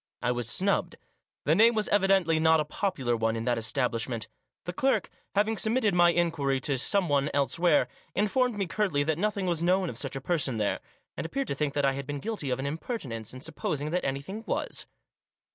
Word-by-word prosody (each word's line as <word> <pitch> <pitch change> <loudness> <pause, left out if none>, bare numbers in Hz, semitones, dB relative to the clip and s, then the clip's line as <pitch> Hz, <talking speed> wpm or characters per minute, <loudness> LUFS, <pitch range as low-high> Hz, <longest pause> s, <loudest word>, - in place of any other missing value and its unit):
I 125 - +2
was 120 -2 -1
snubbed. 195 - +1 0.5
The - - +3
name 230 +2 +5
was 215 -1 +1
evidently 195 -5 +3
not 160 0 +5
a 150 - 0
popular 150 - -1
one 115 0 0
in 115 0 -3
that 120 -2 +1
establishment. 115 -1 -1 0.4
The 180 - -4
clerk, 265 +9 +1 0.2
having 215 +2 +2
submitted 220 -2 +2
my 175 -1 +6
inquiry 165 -6 +1
to 140 -3 0
someone 150 -4 +2
elsewhere, 165 +5 +3 0.3
informed 215 +4 +1
me 200 - 0
curtly 180 -5 0
that 155 +1 -1
nothing 205 -1 0
was 170 -3 0
known 180 +1 +2
of - - -6
such 135 -1 -5
a - - -2
person 140 -5 0
there, 105 -2 0 0.4
and - - -4
appeared 275 +10 -3
to - - -1
think 145 0 -2
that 145 -1 +2
I 135 - +4
had 135 0 -5
been 145 0 -3
guilty 210 -7 -4
of 125 - 0
an 135 - -4
impertinence 140 - -4
in 130 - -9
supposing 150 +1 -3
that 180 +1 0
any 135 0 -1
thing 205 +8 -7
was. - - -2
160 Hz, 205 wpm, -28 LUFS, 135-195 Hz, 0.5 s, my